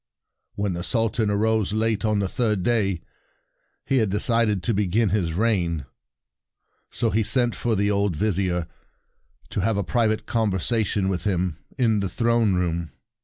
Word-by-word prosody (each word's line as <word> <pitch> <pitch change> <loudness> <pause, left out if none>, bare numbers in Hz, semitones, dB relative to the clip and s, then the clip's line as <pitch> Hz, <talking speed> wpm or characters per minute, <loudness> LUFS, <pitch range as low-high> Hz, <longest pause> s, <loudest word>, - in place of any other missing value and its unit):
"When 100 -2 -1
the 85 - -4
Sultan 115 0 +1
arose 105 0 +1
late 110 0 0
on 105 -1 +1
the 100 -1 0
third 105 -2 0
day, 100 -6 0 0.8
he 135 - +1
had 110 -5 +2
de 105 +2 0
cided 115 -5 +1
to 115 - +1
begin 105 +2 +1
his 90 -4 0
reign. 85 - 0 1.0
So 115 -3 -1
he 110 - +2
sent 120 +2 +1
for 115 -2 0
the 100 +1 +1
old 100 -3 +1
Vizier, 90 -2 0 0.9
to - - -2
have 105 +2 +1
a 100 - 0
private 110 +2 0
conversation 105 -2 0
with 90 -3 -2
him 90 -4 -1 0.2
in 115 -4 +2
the 100 -1 -1
throne 115 0 +2
room. 85 -2 -1
105 Hz, 160 wpm, -24 LUFS, 95-115 Hz, 1.0 s, had